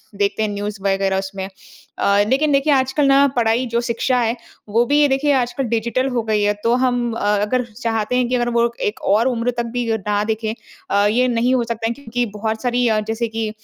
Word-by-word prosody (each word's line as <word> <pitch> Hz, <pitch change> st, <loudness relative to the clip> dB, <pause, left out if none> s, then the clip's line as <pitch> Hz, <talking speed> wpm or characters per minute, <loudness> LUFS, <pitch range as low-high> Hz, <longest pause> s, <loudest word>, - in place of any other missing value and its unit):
देखते 200 Hz, +2 st, 0 dB
हैं 215 Hz, -, 0 dB
न्यूज़ 205 Hz, 0 st, -5 dB
वग़ैरह 195 Hz, -1 st, +1 dB
उसमें। 190 Hz, 0 st, -5 dB, 0.5 s
अ, 200 Hz, +1 st, +3 dB
लेकिन 285 Hz, +4 st, +2 dB
देखिए 280 Hz, +1 st, +3 dB
आजकल 270 Hz, +2 st, +1 dB
ना 275 Hz, +1 st, +5 dB
पढ़ाई 235 Hz, +1 st, +2 dB
जो 235 Hz, 0 st, +1 dB
शिक्षा 245 Hz, +2 st, 0 dB
है, 230 Hz, 0 st, 0 dB, 0.3 s
वो 230 Hz, +3 st, +2 dB
भी 290 Hz, +4 st, +2 dB
ये 295 Hz, -, +5 dB
देखिए 275 Hz, +2 st, +1 dB
आजकल 255 Hz, +1 st, 0 dB
डिजिटल 235 Hz, +3 st, 0 dB
हो 240 Hz, -3 st, -1 dB
गई 215 Hz, -1 st, 0 dB
है। 205 Hz, 0 st, +2 dB
तो 230 Hz, +1 st, +3 dB
हम 245 Hz, -2 st, 0 dB
अ, -, -, -4 dB, 0.2 s
अगर 245 Hz, +4 st, 0 dB
चाहते 225 Hz, 0 st, -2 dB
हैं 250 Hz, -1 st, +1 dB
कि 255 Hz, -, +1 dB
अगर 240 Hz, -1 st, 0 dB
वो 235 Hz, 0 st, +1 dB
एक 210 Hz, -, -2 dB
और 220 Hz, +5 st, +2 dB
उम्र 245 Hz, -1 st, 0 dB
तक 235 Hz, -, -1 dB
भी 245 Hz, -2 st, -1 dB
अ, 220 Hz, -, +1 dB
ना 205 Hz, 0 st, +1 dB
देखें। 220 Hz, 0 st, -2 dB, 0.4 s
अ, 200 Hz, 0 st, +3 dB
ये 250 Hz, +4 st, +2 dB
नहीं 245 Hz, +1 st, +1 dB
हो 240 Hz, -, +1 dB
सकता 230 Hz, -1 st, -3 dB
है 235 Hz, -, -1 dB
क्योंकि 245 Hz, -2 st, -3 dB
बहुत 220 Hz, +1 st, -2 dB
सारी 245 Hz, -1 st, +1 dB
अ, 215 Hz, -1 st, +2 dB
जैसे 230 Hz, +1 st, -1 dB
कि 220 Hz, -1 st, -3 dB
235 Hz, 230 wpm, -19 LUFS, 215-250 Hz, 0.5 s, ना